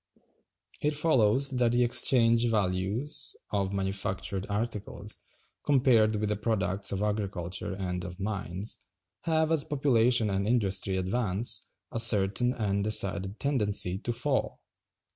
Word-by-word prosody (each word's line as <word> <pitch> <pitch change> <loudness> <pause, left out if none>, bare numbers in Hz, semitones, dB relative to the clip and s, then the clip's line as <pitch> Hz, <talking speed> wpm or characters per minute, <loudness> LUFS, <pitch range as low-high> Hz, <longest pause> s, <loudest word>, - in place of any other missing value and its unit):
It 150 0 0
follows 140 -3 +2
that 125 -2 +1
the 120 0 +3
exchange 120 -1 +3
values 105 +7 -2 0.2
of 100 -2 -1
manufactured 95 0 -3
articles, 105 -1 -4 0.4
compared 125 -6 +3
with 105 0 -2
the 105 - 0
products 100 -2 -1
of 100 +1 -2
agriculture 95 -3 -3
and 90 -2 -4
of 90 +1 -8
mines, 100 0 -4 0.5
have, 160 -1 +1
as 160 -3 +2
population 125 -7 +2
and 100 +1 -1
industry 100 -5 0
advance, 100 +3 +1 0.2
a 115 - -2
certain 110 +2 +5
and 100 -4 -1
decided 100 -1 0
tendency 105 -9 +1
to 120 - -3
fall. 130 +3 -2
105 Hz, 125 wpm, -28 LUFS, 95-120 Hz, 0.5 s, certain